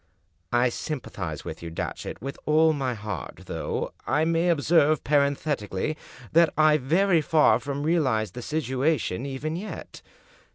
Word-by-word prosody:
" 85 +2 -43
I 120 +1 +3
sympathize 100 - -5
with - - -7
you, 85 - -6
Datchet, 85 +6 -5
with 135 +1 -5
all 160 +1 +5
my 130 -4 -2
heart, 105 -5 -6
though, - - -3
I 150 +4 +2
may 165 +2 +2
observe, 155 -1 +3
parenthetically, 140 -4 0 0.4
that 165 0 +5
I 155 -1 +5
very 165 +5 +3
far 155 0 +4
from 140 0 -4
realize 130 - +1
the 125 - -7
situation 140 - -1
even 140 +4 -3
yet. 200 +5 -7
145 Hz, 140 wpm, -26 LUFS, 125-155 Hz, 0.4 s, all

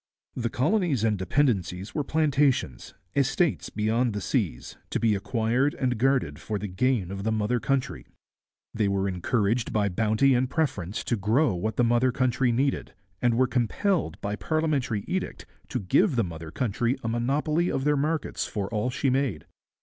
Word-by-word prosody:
The 120 -2 -1
colonies 155 - +1
and 110 -2 +2
dependencies 95 - 0
were 150 - -1
plantations, 140 - +1 0.2
estates 140 +4 +1
beyond 110 +2 0
the 105 - -2
seas, 80 -8 -2
to - - -1
be 115 -2 +3
acquired 115 +7 0
and 125 -2 0
guarded 130 - +1
for 105 - -3
the 105 +1 -4
gain 100 0 0
of 100 0 -5
the 110 - 0
mother 110 +3 0
country. 135 +2 -2 0.7
They 105 -2 +1
were 100 0 0
encouraged 105 +4 0
by 105 -2 +1
bounty 110 +7 +2
and 125 +1 +1
preference 110 - -2
to 120 - 0
grow 115 +7 +2
what 105 +5 -2
the 120 - +4
mother 120 +2 +3
country 130 0 +1
needed, 135 -3 -1 0.3
and 120 -1 +3
were 130 - +4
compelled 130 - 0
by 100 +1 -2
parliamentary 140 -7 -1
edict - - -3 0.2
to - - -2
give 140 - +2
the 115 - +2
mother 80 -3 -7
country 120 - -1
a - - -2
monopoly 145 +9 0
of 135 - -1
their 150 +1 +3
markets 155 +3 -1
for 100 -3 -3
all 110 +3 0
she 135 +1 0
made. 130 - -1
120 Hz, 170 wpm, -26 LUFS, 105-135 Hz, 0.7 s, the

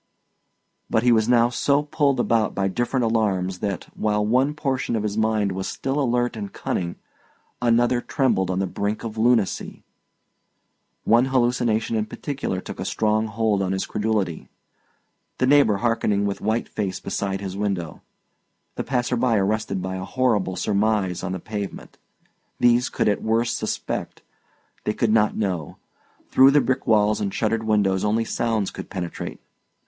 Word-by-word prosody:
But 110 - +2
he 125 - +5
was 110 0 +3
now 120 -1 +5
so 140 +4 +1
pulled 145 -3 +1
about 115 -2 +1
by 95 0 +1
different 120 +6 -1
alarms 100 -5 0
that, 100 -3 -3
while 105 -1 0
one 130 +7 +2
portion 135 -5 -1
of 110 - -1
his 105 -1 -2
mind 110 -2 +1
was 95 +1 -3
still 135 +2 -2
alert 120 -2 0
and 100 -3 -6
cunning, 85 -1 -3 0.7
another 120 +1 +3
trembled 125 - 0
on 90 - -1
the 95 - +1
brink 100 +3 -3
of 110 -2 -5
lunacy. 115 -3 +1 1.2
One 120 +3 +4
hallucination 120 -3 +1
in 110 -1 0
particular 130 -6 -4
took - - -8
a - - -2
strong 110 0 0
hold 110 -2 0
on 95 0 0
his 95 - -1
credulity. 105 -6 -2 0.9
The 130 - +2
neighbour 135 -7 +5
hearkening 105 -2 +1
with 100 -1 -3
white 110 +3 0
face 100 -3 -3
beside 95 -1 -3
his 95 -1 -5
window, 100 -5 -3 0.8
the - - -1
passer 125 -1 0
by 120 -2 +2
arrested 100 -1 -1
by 95 0 -3
a 95 - -5
horrible 115 -8 0
surmise 100 -1 0
on 95 - -3
the 95 - -4
pavement 100 0 -6 0.6
these 120 +1 +4
could - - 0
at 105 - +1
worst 115 +2 +1
suspect, - - -4 0.6
they 105 - 0
could 115 -3 +1
not 110 -1 +3
know; 90 -8 -2 0.5
through 130 +1 +7
the 145 +1 +5
brick 130 +1 -1
walls 105 -1 +3
and 100 -1 -1
shuttered 110 +1 0
windows 100 -3 +2
only 110 +2 +1
sounds 110 -4 -1
could - - -8
penetrate. 90 -4 -5
110 Hz, 160 wpm, -23 LUFS, 100-120 Hz, 1.2 s, through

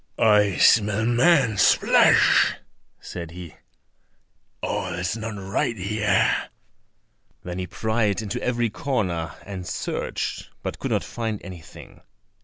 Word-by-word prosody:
"I 105 -3 +3
smell 105 0 +4
man's 120 - +4
flesh," - - +4 0.4
said 85 -2 -7
he; 85 -1 -10 1.1
"all 90 -2 -2
is 90 +3 -2
not 110 -1 -5
right 100 +4 -2
here." 100 +1 +1 0.9
Then 90 +1 -5
he 90 - -4
pried 110 -1 -1
into 105 - -4
every 120 -2 0
corner, 95 - -2
and 95 -3 -7
searched, 90 - -4
but - - -5
could - - -3
not - - 0
find 110 -3 -4
anything. 90 -4 -12
105 Hz, 115 wpm, -23 LUFS, 90-115 Hz, 1.1 s, smell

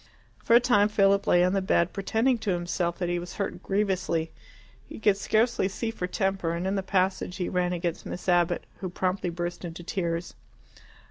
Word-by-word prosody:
For 230 - +4
a - - +9
time 230 -4 +4
Philip 200 -1 +3
lay 175 0 +5
on 180 +1 +2
the 195 - +1
bed, 180 -2 +1
pretending 225 +5 +1
to 210 - -3
himself 175 -1 -1
that 180 - -2
he 175 0 0
was 175 +1 -8
hurt 200 -2 -3
grievously. 190 -5 0 0.6
He - - -8
could 210 -2 +4
scarcely 220 +1 +1
see 225 +4 -3
for 180 -5 -4
temper, 190 -3 -1
and 170 +2 -3
in 190 - 0
the 195 - 0
passage 185 -1 0
he 185 -2 -2
ran 180 -1 0
against 170 -1 -3
Miss 180 - -7
Abbott, 175 -1 +2 0.2
who 185 - -4
promptly 185 0 -1
burst 175 +1 -4
into 175 0 -7
tears. 170 -1 -3
185 Hz, 195 wpm, -27 LUFS, 175-200 Hz, 0.6 s, a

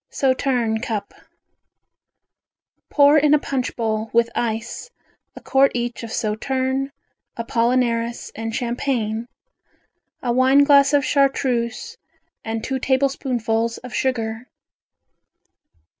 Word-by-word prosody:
Sauterne 255 -4 0
Cup 225 -5 -4 1.8
Pour 290 +1 +5
in 300 0 +4
a - - +2
punch 265 -3 -3
bowl, 220 -1 -2
with 235 0 +2
ice, 230 - -3 0.5
a - - -10
quart 270 0 +3
each 240 0 -3
of 230 -1 -7
sauterne, 260 +5 -1 0.5
apollinaris 235 0 0
and 225 0 -5
champagne, 235 -2 -2 1.0
a 245 - 0
wine 260 +3 +5
glass 280 -1 +5
of 285 -2 +3
Chartreuse 270 - 0 0.5
and 225 0 -4
two 265 0 -2
tablespoonfuls 250 -4 0
of 250 - -9
sugar. 230 -2 -2
245 Hz, 100 wpm, -21 LUFS, 230-270 Hz, 1.8 s, Pour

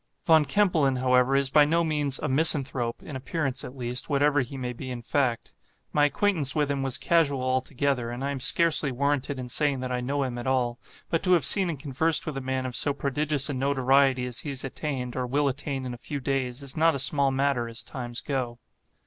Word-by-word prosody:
Von 160 -2 +4
Kempelen, 165 -9 +1
however, 125 +1 +2
is 135 -1 +1
by 150 0 +6
no 165 +3 +1
means 150 -4 0
'a - - -4
misanthrope,' 135 -4 +2
in 145 - -9
appearance, 135 0 -3
at 130 - -10
least, 125 +2 -3
whatever 145 0 +2
he 130 +2 -7
may 125 -1 -4
be 130 +2 -8
in 120 -2 -7
fact. 130 -3 -2 0.4
My 145 -1 +3
acquaintance 150 -1 0
with 145 -2 0
him 140 -1 -2
was 135 -2 -2
casual 145 -6 +1
altogether; 130 -1 -1
and 120 +2 -6
I 140 - -2
am 140 - -5
scarcely 150 +1 +3
warranted 140 +1 -1
in 125 -1 -6
saying 140 +2 0
that 130 0 -4
I 125 0 -2
know 140 +3 -2
him 125 -2 -4
at 120 - -6
all; 125 -2 -1 0.3
but 165 - 0
to 185 - +2
have 165 -7 +3
seen 185 +5 +7
and 155 -5 -5
conversed 150 +4 +1
with 155 - -5
a 135 - -4
man 130 0 -3
of 125 -1 -5
so 145 - +4
prodigious 140 +1 +1
a 145 - -3
notoriety 135 -1 +1
as 125 0 -4
he 150 - -5
has 135 -2 -4
attained, 135 -2 -5
or 125 -1 -3
will 145 +3 0
attain 135 0 -4
in 125 - -5
a 120 - -10
few 145 +3 -6
days, 130 -1 -3
is 135 -1 -4
not 160 0 +2
a - - -2
small 140 +1 +2
matter, 135 -3 -1
as 115 +1 -4
times 120 -2 -6
go. 130 -5 -4
135 Hz, 225 wpm, -26 LUFS, 125-145 Hz, 0.4 s, seen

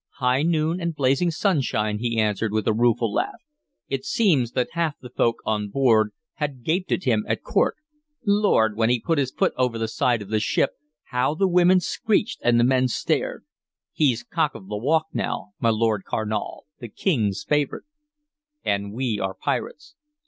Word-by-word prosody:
"High 125 +1 +2
noon 165 +2 +1
and 170 -1 -2
blazing 140 +5 +2
sunshine," 135 - 0
he 115 0 -1
answered, 105 0 0
with 110 -1 -1
a 110 - +3
rueful 115 -1 +2
laugh. - - -2 0.5
"It 135 -1 -3
seems 145 - +2
that 125 - 0
half 165 -3 -1
the 125 - -11
folk 115 -1 0
on 105 -1 -1
board 110 -3 +3 0.3
had 140 -5 -4
gaped 180 +7 -1
at - - 0
him 115 -5 +2
at - - -2
court. - - +1 0.5
Lord! 200 - +3
when 115 +1 +2
he 125 0 +2
put 160 +6 0
his 135 -2 +1
foot - - 0
over 125 -3 +1
the 115 0 -1
side 115 0 0
of 100 - -13
the 110 0 +1
ship, 110 - +1 0.4
how 125 +4 +1
the 195 +4 +2
women 180 +1 +5
screeched 205 +4 -1
and 120 0 +4
the - - +4
men 130 +1 +3
stared! 125 - -2 0.5
He 140 -6 +3
's 120 - -8
cock 145 +4 -1
of 95 - -11
the 105 - -3
walk 155 +8 +2
now, 115 -5 -3
my 115 - +2
Lord 110 -2 +1
Carnal, 110 -1 -3
the 120 -4 -8
King's 115 - 0
favorite!" 150 -2 0 0.8
"And 100 0 -1
we 120 -3 -1
are 95 0 -2
pirates." 300 - -4
125 Hz, 185 wpm, -24 LUFS, 110-155 Hz, 0.8 s, women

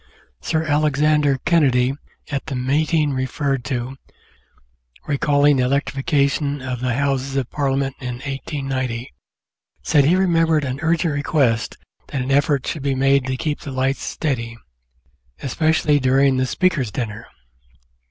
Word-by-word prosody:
Sir 160 - -1
Alexander 150 -1 +2
Kennedy, 135 -6 +3 0.4
at 140 +1 -3
the 135 - -3
meeting 150 +3 +1
referred 130 0 -1
to, 130 0 -3 1.1
recalling 145 0 +3
the 130 - +2
electrification 140 +1 0
of 130 -2 -4
the 125 -1 -1
Houses 135 -1 -1
of 135 -3 -2
Parliament 135 -1 -1
in 125 -3 -4
1890, 130 - -4 0.7
said 145 -3 +3
he 165 +5 +4
remembered 165 -4 +2
an 130 0 -3
urgent 165 -1 +1
request 140 -5 0 0.3
that 140 - -4
an 130 +2 -2
effort 140 0 +2
should 155 - -3
be 135 -1 0
made 135 0 +2
to 130 0 -2
keep 150 +1 -2
the 150 - -8
lights 130 +1 -1
steady, 115 -6 -3 0.9
"especially 150 +1 +2
during 135 0 +3
the 130 0 +1
Speaker's 160 - +1
dinner." 110 -1 -5
140 Hz, 135 wpm, -21 LUFS, 130-150 Hz, 1.1 s, he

